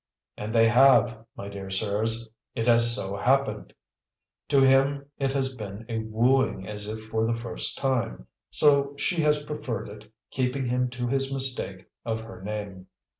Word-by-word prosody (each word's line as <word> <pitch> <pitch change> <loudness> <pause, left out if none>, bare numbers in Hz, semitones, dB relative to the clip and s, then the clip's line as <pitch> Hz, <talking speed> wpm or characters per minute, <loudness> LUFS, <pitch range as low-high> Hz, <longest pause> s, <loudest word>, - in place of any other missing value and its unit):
And 105 +1 -5
they 115 -1 +5
HAVE, 120 -1 +5 0.2
my 100 - -6
dear 100 -1 -7
sirs! 110 +4 -1 0.3
It 115 - -1
has 115 -1 +5
so 100 -5 -4
happened. 105 0 +1 0.8
To 140 - +3
him 135 +1 +3
it 135 -1 0
has 135 -1 -1
been 105 -2 -8
a 115 -1 -2
wooing 110 -2 +1
as 105 0 -5
if 110 +1 -5
for 110 0 -1
the 115 +1 +1
first 115 0 -3
time; 130 - -1 0.2
so 140 -1 +3
she 170 +3 0
has 150 -1 +2
preferred 120 -9 -4
it, 105 +1 -13 0.2
keeping 130 +1 -1
him 125 +1 0
to 125 0 -4
his 135 +2 0
mistake 130 -8 0 0.2
of 110 -1 -2
her 110 -3 -11
name. 100 -2 -6
115 Hz, 165 wpm, -26 LUFS, 105-135 Hz, 0.8 s, they